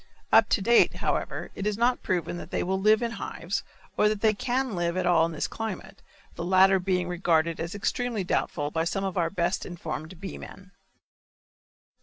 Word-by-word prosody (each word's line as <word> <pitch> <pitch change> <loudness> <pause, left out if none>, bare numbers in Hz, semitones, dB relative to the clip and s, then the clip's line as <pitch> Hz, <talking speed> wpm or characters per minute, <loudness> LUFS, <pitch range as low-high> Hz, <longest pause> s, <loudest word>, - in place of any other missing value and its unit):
Up - - +6
to 200 - +1
date, 235 +3 +5
however, - - -2
it 195 - -3
is 210 -1 -1
not 245 +2 +2
proven 175 -1 -2
that - - -8
they - - -1
will 190 +1 -1
live 215 +3 +4
in 235 - -1
hives 195 -4 -4 0.4
or 210 - +4
that 210 -1 -2
they 215 0 +4
can 250 +3 -1
live 175 0 -1
at 185 - 0
all 165 -2 +4
in - - -6
this 155 - -2
climate; 220 -4 -6 0.3
the 170 - -6
latter 190 +2 +5
being 180 -1 0
regarded 170 -2 +1
as 170 +3 -4
extremely 225 +1 -1
doubtful 150 -4 -1
by 160 +1 0
some 195 +3 -2
of 190 -2 -2
our 170 -3 +1
best 175 0 -1
informed 165 -1 -6
bee 195 - -7
men. 195 -1 -12
185 Hz, 195 wpm, -27 LUFS, 170-210 Hz, 0.4 s, Up